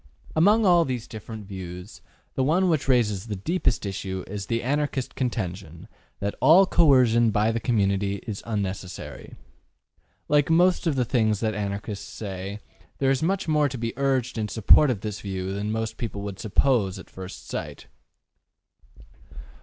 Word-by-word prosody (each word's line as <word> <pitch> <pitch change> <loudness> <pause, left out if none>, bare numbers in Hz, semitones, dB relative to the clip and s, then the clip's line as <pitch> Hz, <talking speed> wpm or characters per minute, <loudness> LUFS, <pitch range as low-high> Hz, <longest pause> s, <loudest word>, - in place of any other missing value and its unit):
Among 205 +7 +4
all 175 -2 +6
these 125 -5 -4
different 110 -1 -8
views, 90 -1 -8 0.3
the 130 - 0
one 175 +7 +2
which 155 -5 0
raises 115 -6 +1
the 105 - -3
deepest 120 - -1
issue 95 -1 -4
is 100 -1 -6
the 115 -1 -1
Anarchist 140 0 -1
contention 95 - -4 0.3
that 100 0 -2
all 165 +8 +7
coercion 130 -10 +4
by 105 +1 +2
the 115 - -1
community 100 -4 +1
is 105 -3 -5
unnecessary. 95 -4 -5 0.9
Like 145 0 +3
most 175 +2 +3
of 155 - +1
the 125 -2 +1
things 110 -4 +1
that 110 -1 0
Anarchists 100 0 -4
say, 100 0 -6 0.4
there 135 -1 +2
is 135 - 0
much 190 +4 0
more 150 -2 +2
to 130 - -6
be 115 -1 -3
urged 130 -3 0
in 105 - -1
support 115 +7 +5
of 110 -6 -1
this 105 -1 -5
view 95 -1 -4
than 100 +2 -3
most 110 0 -3
people 105 -4 -5
would 100 -1 -6
suppose 110 -3 +1
at 95 - -11
first 95 0 -10
sight. - - -6
110 Hz, 160 wpm, -25 LUFS, 100-135 Hz, 0.9 s, all